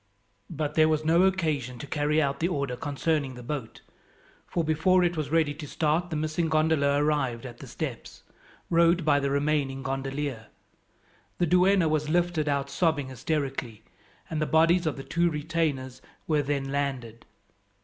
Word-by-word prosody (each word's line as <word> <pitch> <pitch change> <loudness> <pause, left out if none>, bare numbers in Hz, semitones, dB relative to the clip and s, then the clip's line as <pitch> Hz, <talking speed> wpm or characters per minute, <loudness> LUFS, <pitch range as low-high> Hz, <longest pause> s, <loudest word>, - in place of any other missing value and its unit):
But 150 -2 -3
there 155 0 +4
was 155 0 0
no 165 +2 +4
occasion 155 -10 0
to 145 - -7
carry 150 +1 0
out 140 -2 0
the 170 - +1
order 140 -7 -2
concerning 145 0 -1
the 125 - -10
boat, 130 -3 -5 0.7
for 170 - -1
before 160 +4 +3
it 175 0 +1
was 155 -3 -3
ready 160 -2 +2
to 150 0 -8
start 160 +4 0
the 160 - -3
missing 155 +2 -1
gondola 155 -2 +2
arrived 145 -5 0
at 120 -2 -9
the - - -10
steps, - - -6 0.5
rowed 170 0 +4
by 145 -2 +4
the 140 0 -1
remaining 140 -1 0
gondolier. 135 -3 -3 0.9
The 175 - +2
duenna 180 +1 +4
was 155 -1 0
lifted 170 -2 +1
out 140 -1 -1
sobbing 145 -3 0
hysterically, 130 -4 -3 0.4
and 155 -1 -3
the 155 - 0
bodies 165 +2 +3
of 155 - -2
the 135 - -6
two 170 +3 +1
retainers 150 -5 -2 0.2
were 150 -2 +2
then 140 -1 -2
landed. 130 -5 -3
150 Hz, 165 wpm, -27 LUFS, 140-160 Hz, 0.9 s, there